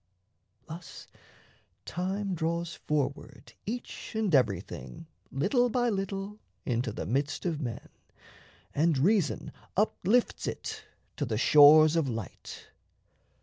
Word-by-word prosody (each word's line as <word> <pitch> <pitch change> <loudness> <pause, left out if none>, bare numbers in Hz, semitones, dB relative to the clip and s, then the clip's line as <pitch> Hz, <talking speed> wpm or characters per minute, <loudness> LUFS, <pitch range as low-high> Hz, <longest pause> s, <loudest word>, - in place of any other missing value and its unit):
Thus 165 +2 -9 0.8
time 190 +3 -2
draws 170 0 -2
forward 145 -2 -3
each 240 0 -6
and 215 -5 0
everything 125 - 0 0.3
Little 215 - +2
by 245 0 +1
little 195 +1 -4 0.3
into 120 -1 -1
the 90 - -5
midst 140 - -1
of 160 -4 -1
men, 120 -5 -5 0.9
And 160 0 +2
reason 185 +4 +1 0.3
uplifts 215 +3 +1
it 435 0 -5 0.3
to 145 - -1
the 110 -2 -1
shores 150 +4 +7
of 160 -5 +1
light. 115 -4 -7
165 Hz, 105 wpm, -29 LUFS, 140-200 Hz, 0.9 s, shores